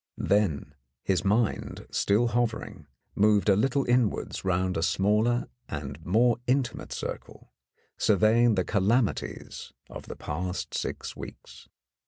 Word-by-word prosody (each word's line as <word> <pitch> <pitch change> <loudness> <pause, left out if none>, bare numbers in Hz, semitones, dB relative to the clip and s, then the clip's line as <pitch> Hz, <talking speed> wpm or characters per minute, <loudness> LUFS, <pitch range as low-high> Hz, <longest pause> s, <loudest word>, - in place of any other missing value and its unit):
Then 90 -9 0 0.3
his 95 -1 +1
mind, 105 +2 0
still 110 +4 +2
hovering, 115 -9 -2 0.3
moved 105 0 +3
a 100 - +6
little 135 +6 +1
inwards 120 -3 0
round 95 0 0
a 80 - -1
smaller 105 +7 +2 0.2
and 70 +1 -6
more 115 +7 +3
intimate 130 0 -1
circle, - - -7 0.5
surveying 110 +3 +4
the 90 -2 0
calamities 105 +3 -1 0.2
of - - -9
the - - -7
past 90 +5 -4
six - - -4
weeks. - - -11
105 Hz, 120 wpm, -27 LUFS, 95-120 Hz, 0.5 s, a